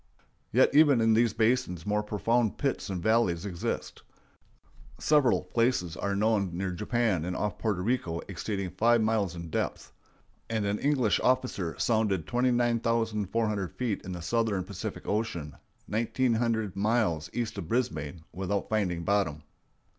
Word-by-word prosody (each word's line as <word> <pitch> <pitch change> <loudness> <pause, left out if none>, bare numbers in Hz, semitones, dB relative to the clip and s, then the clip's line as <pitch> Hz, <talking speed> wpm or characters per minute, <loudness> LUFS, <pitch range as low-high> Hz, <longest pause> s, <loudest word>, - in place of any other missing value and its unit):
Yet - - +4
even 145 -4 +6
in 115 0 +4
these 115 -1 +3
basins 110 -7 +1
more 105 0 +1
profound 110 +2 0
pits 135 -6 -1
and 90 -3 -3
valleys 110 -6 +2
exist. 90 -4 -4 1.0
Several 145 -6 +3
places 115 -8 0
are 100 0 -2
known 100 -4 +1
near 95 0 -2
Japan 105 -2 0
and 90 +1 -3
off 105 -3 -2
Porto 105 -5 -1
Rico 95 -8 -1
exceeding 95 0 -4
five 115 +4 +3
miles 105 -5 0
in 85 -1 -7
depth; - - -3 0.6
and 110 -2 -1
an 100 +1 -1
English 135 -7 +2
officer 125 -9 0
sounded 105 -7 +1
29,400 115 -4 0
feet 120 -5 -2
in 95 - -6
the 85 -1 -6
southern 110 0 0
Pacific - - -6
Ocean, 100 -9 -2 0.3
nineteen 120 +3 +1
hundred 110 -4 0
miles 100 -7 +1
east 120 -2 -3
of 80 - -6
Brisbane, 80 - -2
without 95 +3 -2
finding 90 -6 0
bottom. 85 -6 0
105 Hz, 140 wpm, -29 LUFS, 90-115 Hz, 1.0 s, even